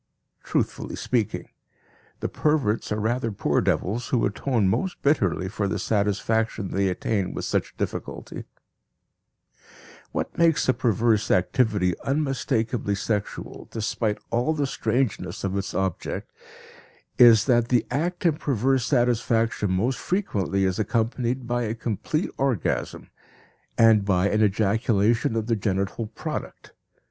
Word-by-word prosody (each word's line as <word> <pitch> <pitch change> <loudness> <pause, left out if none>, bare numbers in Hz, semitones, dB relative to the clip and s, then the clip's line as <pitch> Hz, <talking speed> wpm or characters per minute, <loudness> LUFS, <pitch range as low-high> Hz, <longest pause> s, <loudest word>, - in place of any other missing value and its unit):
Truthfully - - -2
speaking, 115 -5 -1 0.7
the - - 0
perverts 145 -10 0
are 105 - 0
rather 115 +2 0
poor 100 - +1
devils 115 +6 -1
who 125 - +1
atone 105 +1 0
most 185 - -1
bitterly 100 - +2
for 100 +1 -2
the 105 - -1
satisfaction 105 +1 0
they 100 0 +1
attain 95 +1 -1
with - - -3
such - - -2
difficulty. - - -5 1.7
What - - -3
makes 165 -2 +3
the 130 - +3
perverse 110 -2 +1
activity 95 -1 +2
unmistakably 130 -6 0
sexual, 105 0 -4
despite 110 -1 -1
all 125 +7 +1
the 145 -2 0
strangeness 125 -2 -1
of 95 -1 -1
its 100 0 -3
object, 95 -3 -3 0.9
is 115 -3 +8
that 120 -3 +3
the 125 -2 +3
act 175 +7 -2
in 160 -3 +3
perverse 130 -2 +1
satisfaction 115 -4 +1
most 115 +8 0
frequently 100 - -1
is 95 +1 0
accompanied 120 +4 -1
by 120 0 -1
a 115 -1 -2
complete 120 - -2
orgasm, 135 -8 -1 0.7
and 110 -3 +6
by 95 -1 +2
an 105 +1 +1
ejaculation 110 +2 +2
of 110 -1 -1
the 115 0 +1
genital 100 +2 -2
product. 110 - -6
115 Hz, 125 wpm, -25 LUFS, 100-125 Hz, 1.7 s, is